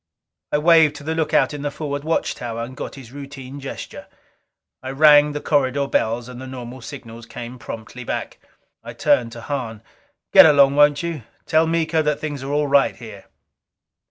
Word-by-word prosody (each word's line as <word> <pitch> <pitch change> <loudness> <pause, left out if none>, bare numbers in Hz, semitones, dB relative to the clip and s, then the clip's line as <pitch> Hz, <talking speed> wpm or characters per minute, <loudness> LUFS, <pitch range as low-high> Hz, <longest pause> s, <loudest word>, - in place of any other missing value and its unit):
I - - +2
waved 160 -1 +5
to 150 - -10
the 160 +2 -2
lookout 160 -1 +1
in 145 - -6
the 145 - -2
forward 145 -1 -5
watch 165 +1 -1
tower, 115 -1 -5
and 130 +2 -8
got - - -7
his 130 -4 -12
routine 140 -1 -9
gesture. 135 -1 -8 0.7
I 130 - -6
rang 145 +1 +5
the 150 - -4
corridor 140 -1 +1
bells, 115 -1 -1
and 125 0 -9
the 130 - -8
normal 130 -1 -8
signals 115 -3 -10
came 125 0 -8
promptly 115 +2 -8
back. - - -5 0.4
I - - -8
turned 115 -1 +1
to 115 - -9
Hahn. 115 -5 -5 0.5
"Get - - +10
along, 140 -2 +5
won't 145 +1 +4
you? 165 -4 -4 0.2
Tell 160 +1 +2
Miko 160 -1 +1
that 150 -1 -1
things 145 -3 -5
are 135 - -6
all 150 +1 +1
right 140 -1 +3
here." 110 -5 -11
140 Hz, 185 wpm, -21 LUFS, 125-150 Hz, 0.7 s, Get